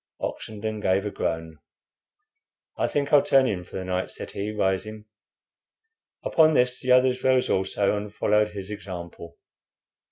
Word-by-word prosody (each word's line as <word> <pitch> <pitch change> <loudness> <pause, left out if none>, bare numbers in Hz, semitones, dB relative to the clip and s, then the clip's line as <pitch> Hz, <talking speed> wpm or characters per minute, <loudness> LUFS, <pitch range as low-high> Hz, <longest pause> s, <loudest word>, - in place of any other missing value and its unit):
Oxenden 110 0 -4
gave 95 +1 +1
a 105 - -2
groan. 80 -3 -3 1.2
"I - - 0
think 145 0 -2
I'll 145 - +8
turn 135 -1 +4
in 95 -7 -2
for 90 - -13
the 95 - -4
night," 90 0 -2
said - - -8
he, 100 +2 -4
rising. 105 +1 -2 1.2
Upon 155 -1 +4
this 125 -1 +2
the 125 - -1
others 125 0 +4
rose 130 -1 +3
also 95 +2 +1
and 105 0 -5
followed 105 0 +2
his 100 -1 -8
example. 85 -4 -8
105 Hz, 150 wpm, -25 LUFS, 95-125 Hz, 1.2 s, I'll